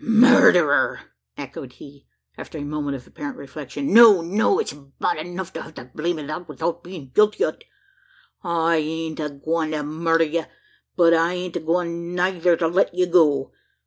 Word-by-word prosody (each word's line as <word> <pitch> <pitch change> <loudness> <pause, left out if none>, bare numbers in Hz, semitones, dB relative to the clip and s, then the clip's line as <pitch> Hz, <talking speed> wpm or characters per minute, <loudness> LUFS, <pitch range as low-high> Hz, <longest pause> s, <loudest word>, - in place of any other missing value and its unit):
"Murderer!" 230 - +5 0.4
echoed 135 -2 -8
he, 140 +1 -15 0.3
after - - -9
a - - -6
moment 145 -1 -4
of 125 - -15
apparent 145 -1 -8
reflection. 140 +2 -6
"No, 220 -5 +8
no; 205 - +1
it's 445 - -2
bad 145 +4 -4
enuf 175 +3 -6
to - - -6
hev 160 - -12
the - - -9
blame 170 +2 -2
o' 150 - -7
that, 155 +4 -6
'ithout 165 +4 -3
bein' 170 -7 -10
guilty 210 - +3
o't. - - -6 0.8
I 170 -2 +1
ain't 160 +1 -4
agwine 155 +2 -3
to 150 -1 -2
murder 165 +2 +1
ye; 160 +1 -2 0.5
but 170 -2 +4
I 165 +1 +2
ain't 180 -1 -6
agwine 170 +1 -2
neyther 180 -1 +1
to 165 - 0
let 175 +4 +1
ye 180 0 +2
go. 155 -6 +2
165 Hz, 170 wpm, -22 LUFS, 150-180 Hz, 0.8 s, No